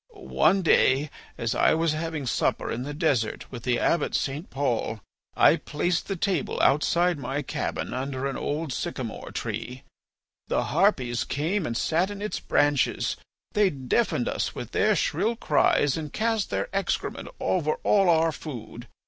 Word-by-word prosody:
One 110 Hz, -, +2 dB
day 140 Hz, -2 st, +3 dB, 0.3 s
as 115 Hz, +1 st, -1 dB
I 125 Hz, -, +3 dB
was 165 Hz, 0 st, +1 dB
having 160 Hz, -2 st, -3 dB
supper 120 Hz, -, 0 dB
in 115 Hz, -, -3 dB
the 145 Hz, +3 st, -5 dB
desert 145 Hz, -9 st, 0 dB
with 120 Hz, -, -7 dB
the 125 Hz, 0 st, +1 dB
Abbot 165 Hz, +3 st, +1 dB
St. 145 Hz, +6 st, -2 dB
Paul, 120 Hz, -5 st, -1 dB, 0.4 s
I -, -, +6 dB
placed 170 Hz, +3 st, -1 dB
the 195 Hz, -, -2 dB
table 185 Hz, -4 st, -1 dB
outside 170 Hz, +3 st, +3 dB
my 140 Hz, +1 st, -3 dB
cabin -, -, -3 dB
under 130 Hz, +1 st, -3 dB
an 140 Hz, -, -2 dB
old 150 Hz, -1 st, -2 dB
sycamore -, -, -4 dB
tree. 125 Hz, +2 st, -5 dB, 0.6 s
The -, -, +1 dB
harpies 120 Hz, -2 st, +2 dB
came 165 Hz, +6 st, -1 dB
and 115 Hz, -, -2 dB
sat 170 Hz, +8 st, +1 dB
in 205 Hz, -1 st, -6 dB
its 210 Hz, +1 st, -3 dB
branches; 145 Hz, -3 st, +1 dB, 0.4 s
they 205 Hz, -2 st, +3 dB
deafened 140 Hz, -, 0 dB
us -, -, -2 dB
with -, -, -6 dB
their -, -, +3 dB
shrill 230 Hz, +2 st, 0 dB
cries 145 Hz, -, +2 dB
and 155 Hz, -3 st, -5 dB
cast 225 Hz, -2 st, 0 dB
their -, -, -1 dB
excrement 195 Hz, -, -2 dB
over 155 Hz, -4 st, +1 dB
all 195 Hz, -3 st, +4 dB
our 165 Hz, -1 st, +4 dB
food. 120 Hz, -6 st, -8 dB
150 Hz, 155 wpm, -26 LUFS, 130-175 Hz, 0.6 s, I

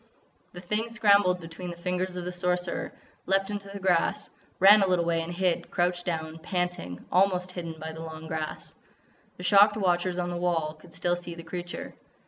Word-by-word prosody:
The 180 Hz, -, -8 dB
thing 210 Hz, +5 st, -1 dB
scrambled 200 Hz, -5 st, +4 dB
between 165 Hz, +1 st, -8 dB
the 170 Hz, -, -7 dB
fingers 180 Hz, +1 st, -2 dB
of 180 Hz, -, -4 dB
the 180 Hz, -, -3 dB
Sorcerer, 180 Hz, 0 st, -1 dB, 0.4 s
leaped 195 Hz, +1 st, +2 dB
into 205 Hz, -1 st, -5 dB
the 200 Hz, -, -7 dB
grass, 180 Hz, -3 st, +1 dB, 0.3 s
ran 200 Hz, +2 st, +8 dB
a 195 Hz, -, +4 dB
little 180 Hz, -2 st, +2 dB
way 165 Hz, -1 st, +1 dB
and 165 Hz, +1 st, -5 dB
hid, 180 Hz, -1 st, 0 dB
crouched 175 Hz, 0 st, 0 dB
down, 160 Hz, -1 st, -3 dB
panting, 180 Hz, -, -3 dB
almost 185 Hz, 0 st, +2 dB
hidden 170 Hz, -3 st, -6 dB
by 160 Hz, +1 st, -6 dB
the 160 Hz, -, -8 dB
long 160 Hz, -1 st, -8 dB
grass. 160 Hz, -1 st, -5 dB, 0.6 s
The 180 Hz, -, -8 dB
shocked 205 Hz, +2 st, +6 dB
watchers 180 Hz, -2 st, +1 dB
on 175 Hz, 0 st, -1 dB
the 175 Hz, -, -3 dB
wall 165 Hz, -3 st, 0 dB
could 160 Hz, +1 st, -17 dB
still 175 Hz, 0 st, +1 dB
see 175 Hz, -1 st, -7 dB
the 170 Hz, -, -9 dB
creature. 175 Hz, +1 st, -6 dB
180 Hz, 190 wpm, -27 LUFS, 170-185 Hz, 0.6 s, ran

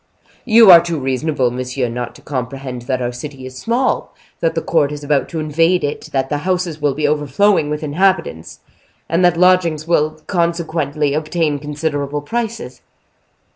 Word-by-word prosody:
"You 225 Hz, -3 st, +7 dB
are 170 Hz, -1 st, +10 dB
too 170 Hz, -1 st, -3 dB
reasonable, 135 Hz, -1 st, -1 dB
monsieur, 125 Hz, +1 st, -3 dB
not 120 Hz, +1 st, -5 dB
to -, -, -16 dB
comprehend 130 Hz, -1 st, -5 dB
that 130 Hz, -1 st, -1 dB
our 120 Hz, -, -2 dB
city 130 Hz, +1 st, -8 dB
is 130 Hz, 0 st, -9 dB
small, 235 Hz, -, -1 dB, 0.2 s
that 165 Hz, -, 0 dB
the 165 Hz, -, 0 dB
court 150 Hz, -4 st, +1 dB
is 150 Hz, 0 st, -7 dB
about 145 Hz, -1 st, 0 dB
to 165 Hz, -, -4 dB
invade 165 Hz, +4 st, +1 dB
it, 145 Hz, 0 st, -4 dB
that 135 Hz, -1 st, 0 dB
the 145 Hz, +1 st, -2 dB
houses 175 Hz, -2 st, -2 dB
will 145 Hz, -2 st, +1 dB
be 150 Hz, -1 st, 0 dB
overflowing 150 Hz, +4 st, +2 dB
with 150 Hz, +1 st, -3 dB
inhabitants, 155 Hz, -, -1 dB, 0.5 s
and 170 Hz, +3 st, +1 dB
that 175 Hz, -1 st, +4 dB
lodgings 175 Hz, -4 st, +3 dB
will 155 Hz, -2 st, +1 dB
consequently 160 Hz, -5 st, -1 dB
obtain 155 Hz, -1 st, -1 dB
considerable 145 Hz, -1 st, -3 dB
prices." 225 Hz, -, -4 dB
150 Hz, 165 wpm, -18 LUFS, 140-170 Hz, 0.5 s, are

